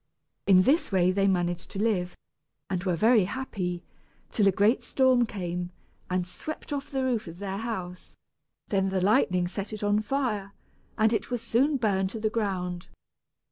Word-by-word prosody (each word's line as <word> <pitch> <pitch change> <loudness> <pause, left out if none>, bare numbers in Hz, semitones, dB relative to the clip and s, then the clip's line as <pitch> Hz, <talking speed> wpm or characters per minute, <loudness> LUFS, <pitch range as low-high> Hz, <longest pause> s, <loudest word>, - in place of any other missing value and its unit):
In 185 -2 +7
this 280 - +2
way 185 -1 +3
they 195 +1 +2
managed 175 -2 0
to 195 - -6
live, 195 -5 0 0.5
and 180 -2 -1
were 185 -3 +1
happy, 200 -4 +1 0.5
till 205 -3 +3
a - - +6
great 205 +5 +3
storm 255 -3 +3
came, 180 -4 -4 0.4
and 180 -1 0
swept 295 - -7
off 285 0 -4
the 265 -1 -1
roof 245 -6 0
of 165 +1 -9
their 195 0 -4
house; 190 -5 -6 0.5
then 195 -1 +1
the 190 0 0
lightning 180 -2 +3
set 200 +3 -5
it 215 - -5
on 205 0 +3
fire, 215 -4 -2 0.4
and 220 0 +3
it 210 -2 -1
was 245 -2 -3
soon 270 +6 +2
burned 195 -5 +1
to 225 - -6
the 215 0 0
ground. 185 -5 -2
200 Hz, 170 wpm, -27 LUFS, 180-230 Hz, 0.5 s, In